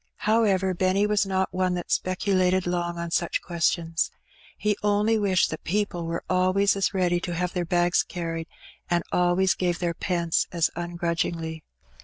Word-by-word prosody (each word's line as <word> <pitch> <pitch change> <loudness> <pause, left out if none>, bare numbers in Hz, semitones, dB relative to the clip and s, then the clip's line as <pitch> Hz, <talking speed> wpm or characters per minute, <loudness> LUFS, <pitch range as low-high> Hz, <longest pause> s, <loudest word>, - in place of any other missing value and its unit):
However, 200 -4 +3
Penny 185 +3 +2
was 210 -1 +1
not 190 0 -1
one 185 -1 +1
that 175 - -5
speculated 185 0 +1
long 175 -1 -2
on 170 0 -4
such 170 0 0
ques 170 -2 +1
tions; 165 -1 -1 0.5
he 210 0 +1
only 210 +2 +2
wished 195 -3 +2
that 155 - -6
people 180 -3 -1
were 165 0 -3
always 185 +2 +2
as 195 -1 +1
ready 180 -3 +1
to 175 -1 -4
have 180 +1 -2
their 180 -2 -1
bags 175 0 +2
carried, 165 -2 -5 0.4
and 175 -1 +1
always 180 +1 +3
gave 175 -2 -1
their 175 -1 -1
pence 170 -1 0
as 170 -2 +1
ungrudgingly. 170 -2 -3
180 Hz, 165 wpm, -25 LUFS, 170-190 Hz, 0.5 s, However